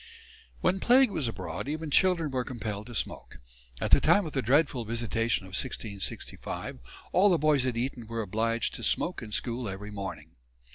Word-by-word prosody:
When 190 - +2
plague 250 +1 +5
was 140 - -1
abroad 115 - -5
even 155 +1 -3
children 170 -3 +3
were 130 -1 0
compelled 110 -4 -5
to 120 - -9
smoke. - - -3 0.4
At - - -2
the - - +7
time 205 -2 +4
of 155 - -6
the 135 - +1
dreadful 135 0 +2
visitation 115 -2 -1
of - - -11
1665 100 - -4 0.3
all 195 +3 +5
the 175 - +4
boys 150 -4 +3
at 120 -2 -1
Eton 120 -1 -3
were 115 0 -2
obliged 115 +4 0
to - - -6
smoke 180 - +1
in 110 -2 -8
school 120 +1 -2
every 100 +2 -6
morning. 85 -6 -6
120 Hz, 180 wpm, -29 LUFS, 110-150 Hz, 0.4 s, the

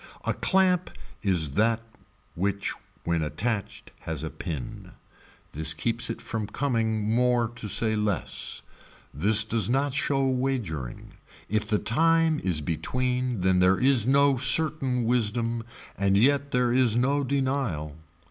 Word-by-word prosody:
A - - +1
clamp 185 -2 +1 0.3
is 85 -8 +2
that 110 +8 +2 0.5
which 100 +3 -2 0.3
when 85 -1 0
attached 100 +8 -3
has 80 -2 -5
a 80 - -4
pin. 75 -9 -7 0.6
This 80 +1 -2
keeps 115 +9 -1
it 115 - -4
from 110 -2 -4
coming 110 -5 -1
more 120 -1 +2
to 115 -2 -6
say 110 +2 +1
less. 105 -4 -1 0.5
This 105 +9 +4
does 110 -2 0
not 135 +2 +1
show 135 -1 +1
wagering. 125 - -3 0.4
If 105 0 -1
the 105 -1 +1
time 165 +6 +2
is 90 -5 -1
between 125 - -2
then 95 0 +3
there 90 +1 +4
is 130 -4 +3
no 140 0 +4
certain 135 -3 +2
wisdom 115 0 0 0.3
and 100 0 +2
yet 140 +5 +3
there 125 -2 +1
is 125 -3 +3
no 140 +4 +1
denial. 130 - -2
115 Hz, 135 wpm, -26 LUFS, 95-130 Hz, 0.6 s, This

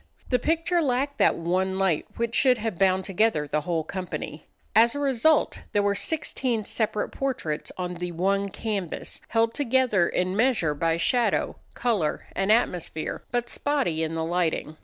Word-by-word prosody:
The 250 - +2
picture 330 +5 +1
lacked 280 0 0
that - - +4
one 185 +3 0
light 190 -5 +1
which 235 0 -1
should 255 -1 +5
have 220 -5 -4
bound 190 -1 +3
together 195 -6 +1
the 150 +1 0
whole 165 0 -1
company. 160 -3 -6 0.3
As 230 +4 +5
a - - -2
result 285 +2 +2
there 205 - +3
were 200 0 +2
sixteen 250 -3 -2
separate 215 -1 -1
portraits 255 - -3
on 180 -1 -3
the 175 0 -5
one 195 +4 0
canvas, 200 -4 -4
held 225 0 +1
together 255 - +2
in 185 +1 -1
measure 220 - +2
by 165 +2 0
shadow, 230 +4 +1 0.2
color 220 -11 0
and 195 +2 +1
atmosphere, 180 -8 0
but 240 0 -1
spotty 265 - -1
in 160 0 -2
the 160 0 -1
lighting. 165 -2 -1
200 Hz, 160 wpm, -26 LUFS, 175-245 Hz, 0.3 s, should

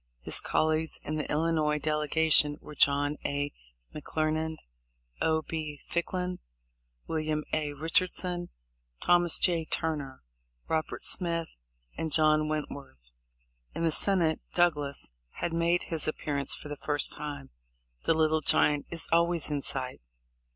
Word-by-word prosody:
His - - +3
col 155 - +1
leagues 160 0 0
in 155 +1 -3
the 150 - -3
Illinois 155 -1 +1
delegation 150 0 +3
were 150 - -11
John 145 +1 +3
A. 145 0 -1 0.4
McClernand, 155 +1 -2 0.6
O. 160 0 +2
B. 155 -3 -5
Ficklin, 180 +1 -2 0.7
William 155 -1 -1
A. 150 -2 0
Richardson, 175 +3 0 0.5
Thomas 175 -1 +4
J. 170 -3 +1
Turner, 145 - -3 0.4
Robert 160 0 -2
Smith, 170 -2 -1 0.4
and 160 - -3
John 155 0 +3
Went 155 -1 -2
worth. 65 - -11 0.6
In - - -2
the 165 - +3
Senate 170 -2 +4
Douglas 150 - +1 0.2
had 170 - -3
made 170 +1 +2
his 160 -2 -3
appearance 145 -3 0
for - - -9
the 145 0 -6
first 145 0 +3
time. 145 -2 -5 0.5
The 165 - +3
Little 155 0 +2
Giant 145 -1 +2
is 165 -1 -2
always 170 -1 +2
in 145 -1 -1
sight 130 - -2
155 Hz, 130 wpm, -29 LUFS, 150-165 Hz, 0.7 s, Thomas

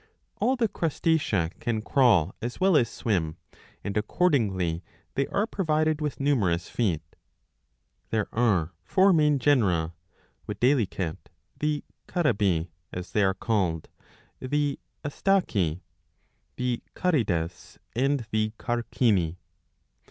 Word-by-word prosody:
All 260 - +2
the 240 -3 +2
Crustacea 155 - 0
^ - - -30
can 110 -2 -1
crawl 110 - +4
as 120 +1 -4
well 190 -2 +4
as 120 -6 +4
swim, 90 -11 -1 0.5
and 100 - -3
accordingly 105 - +1 0.3
they 135 0 0
are 205 - 0
provided 155 -7 0
with 145 -6 -2
numerous 100 -12 +1
feet. 90 -10 0 1.1
There 110 -2 0
are 95 -8 +2
four 190 +1 +4
main 150 -3 +4
genera, 100 - +2 0.5
viz. 125 -4 +2 0.7
the 150 -1 0 0.2
Carabi, 100 - +1 0.2
as 90 0 -6
they 105 - +2
are 95 0 +2
called, 95 -8 -1 0.5
the 145 +2 -1 0.3
Astaci, 120 - +1 0.7
the 125 -1 -1
Carides, 95 - -1 0.2
and 135 0 +1
the 110 0 0
Carcini. 115 -7 +1
120 Hz, 110 wpm, -27 LUFS, 95-150 Hz, 1.1 s, crawl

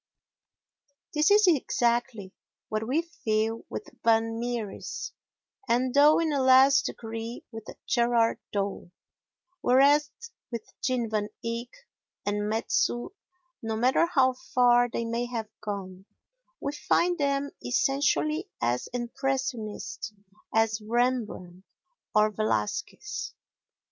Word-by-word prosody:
This 300 0 +3
is 415 0 +6
exactly 240 - +1 0.4
what 215 +1 -2
we 300 +7 +1
feel 225 -8 -2
with - - -5 0.2
Van 225 0 +2
Mieris 235 -4 -4 0.6
and, 245 +2 +2
though 295 +2 +6
in 320 -2 0
a 280 - +1
less 260 +1 +6
degree, 225 +1 -6
with 225 -1 -9 0.2
Gerard 235 -1 +2
Dow; 200 -3 -3 0.7
whereas 285 +4 +4 0.4
with 230 -2 -4 0.2
Jean 250 -3 0
Van 210 -1 0 0.2
Eyck 230 +1 -3 0.6
and 205 0 -1
Metsu, 230 +2 0 0.5
no 225 -1 -2
matter 255 +8 +3
how 265 -6 +3
far 245 -1 +3
they 235 0 -3
may 235 +1 -2
have 225 -3 -4
gone, 190 -3 -6 0.5
we 280 - -2
find 345 +3 +1
them 280 0 0
essentially 280 - +1
as 120 +1 0
impressionist 240 -3 -3 0.4
as 220 0 +2
Rembrandt 220 -6 -1 0.5
or 215 0 +4
Velasquez. 200 - -2
240 Hz, 110 wpm, -27 LUFS, 220-270 Hz, 0.7 s, is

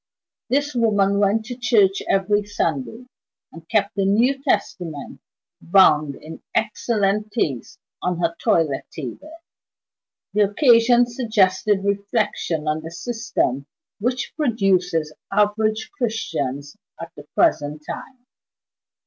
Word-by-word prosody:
This 285 +3 0
woman 205 -4 +2
went 205 +2 +2
to 245 +2 -6
church 220 -5 +3
every 205 +2 +2
Sunday, 205 - -3 0.5
and 165 +1 -14
kept 205 -2 +1
a - - +3
New 235 +8 +2
Testament, 180 - -2 0.4
bound 155 -6 +4
in 160 +1 -11
excellent 210 -1 0
taste, 145 - -2 0.2
on 180 -1 -1
her 170 -1 -1
toilet 155 -5 +1
table! 160 - -8 1.0
The 205 -1 +3
occasion 240 0 +5
suggested 210 -5 +1
reflection 200 -6 -1
on 155 +1 0
the 160 - -7
system 170 - -2 0.3
which 245 +4 -2
produces 185 - +1 0.2
average 215 +2 +1
Christians 155 - -3 0.2
at 165 0 -8
the 145 0 -12
present 150 +1 +1
time. 255 -2 -8
200 Hz, 110 wpm, -22 LUFS, 165-225 Hz, 1.0 s, occasion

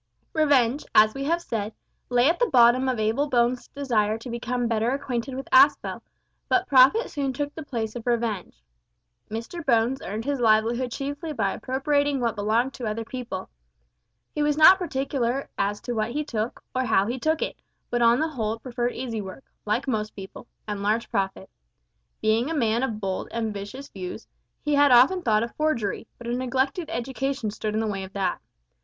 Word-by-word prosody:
Revenge, 285 -4 +3
as 215 0 +6
we 275 0 -4
have 340 +3 0
said, 215 -4 -3 0.3
lay 245 +1 +4
at 330 - +2
the 485 -2 +2
bottom 250 +2 +5
of 255 - -1
Abel 225 +7 0
Bones' 245 -1 +1
desire 225 -6 0
to 230 +2 -8
become 245 +1 -2
better 225 0 +1
acquainted 265 -1 -3
with 270 0 -6
Aspel, 270 +3 +4 0.5
but 380 0 +3
profit 275 - +5
soon 275 -3 -2
took 290 +2 -3
the 320 - -7
place 230 -7 -4
of 240 0 -7
revenge. 225 - -2 0.7
Mr 230 +11 -5
Bones 245 0 +2
earned 215 +5 -5
his 285 -2 -1
livelihood 235 +2 +2
chiefly 285 +5 -4
by 205 -7 0
appropriating 285 +2 0
what 235 -2 0
belonged 225 +5 +1
to 240 - -5
other 220 +1 -3
people. 250 0 -6 0.9
He 300 - -2
was 295 0 +1
not 370 +5 +8
particular 270 -5 -2
as 205 +1 -1
to 245 - -4
what 220 +1 -1
he 300 +2 -1
took, 225 -4 -4
or 255 0 0
how 200 -4 +3
he 245 +4 -3
took 315 +4 +1
it, - - -6 0.3
but 240 0 0
on 235 +1 +5
the 320 +1 0
whole 225 -6 -2
preferred 240 0 -3
easy 230 -4 -3
work 195 +7 -9 0.2
(like 225 +6 0
most 215 -4 -2
people) 195 +4 -10 0.2
and 205 -1 -3
large 215 +3 0
profit. 195 -1 -2 0.8
Being 225 +5 +2
a 325 - -2
man 230 -4 +1
of 230 -5 -2
bold, 190 -2 -3
ambitious 225 +4 -4
views, 185 +3 -7 0.4
he 295 - 0
had 285 -1 +5
often 260 +10 +6
thought 215 -6 +2
of 235 - -5
forgery, 240 -10 -1
but 240 - -11
a 235 - -2
neglected 260 +6 -1
education 265 -2 -2
stood 215 0 -4
in - - +1
the 225 - 0
way 200 -3 -3
of 190 +1 -10
that. 190 -3 -1
240 Hz, 185 wpm, -25 LUFS, 220-275 Hz, 0.9 s, not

